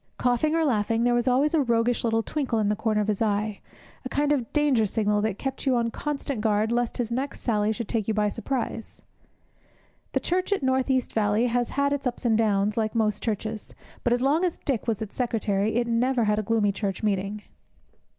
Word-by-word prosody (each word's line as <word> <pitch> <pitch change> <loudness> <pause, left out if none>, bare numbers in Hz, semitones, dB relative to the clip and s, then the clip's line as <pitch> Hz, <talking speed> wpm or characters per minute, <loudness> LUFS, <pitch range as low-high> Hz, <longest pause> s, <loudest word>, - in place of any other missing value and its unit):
Coughing 250 +6 +1
or 325 -1 +2
laughing, 225 -3 +1
there 245 0 +3
was 240 +1 +1
always 270 +5 +3
a 320 - +4
roguish 235 -1 +1
little 225 -1 +1
twinkle 265 -5 -2
in 210 -2 +1
the 210 - +1
corner 215 -1 0
of 210 - -2
his 210 -1 -1
eye, 210 -1 0 0.4
a 255 - -5
kind 290 +2 +1
of 255 -6 0
danger 280 -8 +2
signal 210 0 +1
that 215 -2 -1
kept 270 +1 -4
you 260 - +4
on 230 -1 0
constant 280 -3 -3
guard 215 0 +1
lest 240 0 0
his 240 -2 -2
next 265 +4 -3
sally 215 -2 +1
should 225 0 -4
take 220 -4 -1
you 220 - +1
by 210 -1 +2
surprise. 230 +1 -4 1.1
The - - +2
church 365 +3 -1
at 390 -7 +1
North 260 0 +1
East 260 -2 0
Valley 210 +1 +2
has 245 0 0
had 280 0 +2
its 280 -2 -2
ups 245 +1 -5
and 225 -2 +3
downs, 210 -1 +1
like 220 0 -1
most 215 -2 +1
churches, 220 0 -4 0.3
but 240 - +1
as 245 +1 +2
long 295 +6 +2
as 355 -3 0
Dick 255 -5 -1
was 220 -2 0
its 210 - -10
secretary 220 -4 0
it 240 0 +2
never 240 +1 +1
had 210 0 +2
a - - +1
gloomy 215 -1 +1
church 195 +1 -3
meeting. 205 0 -1
230 Hz, 220 wpm, -26 LUFS, 215-260 Hz, 1.1 s, a